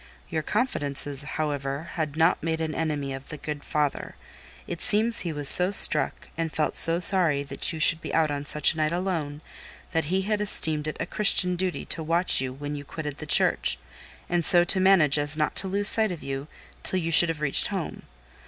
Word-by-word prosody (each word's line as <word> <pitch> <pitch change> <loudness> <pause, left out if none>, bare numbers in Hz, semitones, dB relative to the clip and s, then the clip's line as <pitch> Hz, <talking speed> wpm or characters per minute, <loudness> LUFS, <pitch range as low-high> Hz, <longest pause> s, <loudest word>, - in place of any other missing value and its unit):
Your 160 -1 -4
confidences, 145 - -3
however, 145 0 -6
had 155 -2 -6
not 165 +2 0
made 160 0 -5
an 160 -1 -5
enemy 150 -4 -5
of 135 0 -12
the 150 - -9
good 150 0 -9
father; 150 -2 -5 0.5
it 170 - -9
seems 225 +1 +1
he 170 - -5
was 145 -2 +2
so 180 +6 +12
struck, 200 - +3
and 165 -1 -6
felt 150 +2 -4
so 165 +1 +3
sorry 175 -6 +4
that 140 - -2
you 160 - -9
should 160 +1 +1
be - - -9
out 155 -2 -1
on 145 0 -7
such 150 - +2
a - - -15
night 155 0 -2
alone, 165 -5 -6 0.5
that 160 -3 -3
he 190 +5 -3
had 210 +1 -4
esteemed 155 -7 -2
it 155 - -7
a - - -4
Christian 180 -2 +2
duty 185 0 -6
to - - -6
watch 165 -1 +1
you 130 -1 -6
when 145 +3 -9
you 145 -1 -9
quitted 150 -1 -9
the - - -10
church, - - 0 0.5
and 175 -1 -3
so 175 +2 +6
to 185 +2 +3
manage 175 -7 +2
as 145 +1 +2
not 150 - -3
to 195 - -2
lose 200 +2 +1
sight 220 -2 +3
of 170 - -10
you, 135 +1 -8 0.3
till 185 - 0
you 165 -2 -5
should 170 +1 +4
have 165 -2 -5
reached 140 -3 +2
home. - - -7
160 Hz, 210 wpm, -23 LUFS, 145-180 Hz, 0.5 s, so